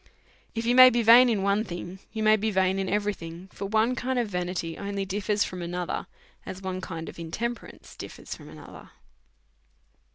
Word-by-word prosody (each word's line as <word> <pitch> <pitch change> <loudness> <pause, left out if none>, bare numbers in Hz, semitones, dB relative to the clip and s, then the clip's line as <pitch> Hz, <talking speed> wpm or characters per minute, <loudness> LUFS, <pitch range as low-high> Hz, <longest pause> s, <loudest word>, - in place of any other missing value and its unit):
If 225 0 -2
you 240 - +3
may 255 0 +10
be 240 -1 +1
vain 240 +3 +8
in 210 -4 0
one 200 +2 +2
thing, 175 -1 -7
you 220 -1 -3
may 215 0 +6
be 215 +1 -1
vain 190 -1 +1
in 190 - -2
every 210 0 0
thing; 170 +1 -10
for 200 - -5
one 220 +4 +2
kind 255 +1 -2
of 240 -2 +1
vanity 180 -3 -3
only 200 -1 -4
differs 205 +2 0
from 180 -1 -6
another, 175 0 -3 0.4
as 185 - -7
one 185 -1 -4
kind 165 -3 -6
of - - -9
intemperance 230 +9 -6
differs - - -8
from - - -11
another. - - -12
200 Hz, 190 wpm, -27 LUFS, 180-225 Hz, 0.4 s, may